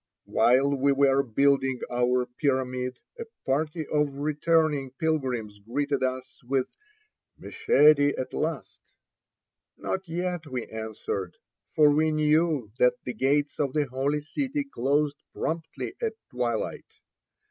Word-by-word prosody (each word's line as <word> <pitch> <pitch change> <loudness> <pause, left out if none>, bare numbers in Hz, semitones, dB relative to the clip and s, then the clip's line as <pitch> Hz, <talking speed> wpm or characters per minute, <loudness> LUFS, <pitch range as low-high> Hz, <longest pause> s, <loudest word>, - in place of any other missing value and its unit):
While 130 +3 +3
we 140 0 +2
were 140 0 +4
building 135 +1 +2
our 125 +1 +2
pyramid 125 -1 -1 0.2
a 465 - -4 0.2
party 155 +4 -1
of 150 -2 0
returning 150 -1 +1
pilgrims 130 -10 -1
greeted 140 +6 -2
us 130 0 -3
with 130 +1 0 0.7
"Meshedi 145 -1 +4
at 130 - -4
last." 155 -2 -3 1.0
"Not 190 -2 -4
yet," 175 -1 -3
we 130 -3 -4
answered, 110 -4 -5 0.4
for 150 -1 +6
we 155 +2 +3
knew 155 -5 +2
that 125 0 +4
the 125 - -4
gates 145 +3 0
of 140 -3 0
the 150 -1 +1
Holy 140 +3 -1
City 275 - -2
closed 145 - 0
promptly 160 -7 -4
at 225 -1 -1 0.2
twilight. 120 -3 -2
140 Hz, 120 wpm, -27 LUFS, 125-155 Hz, 1.0 s, for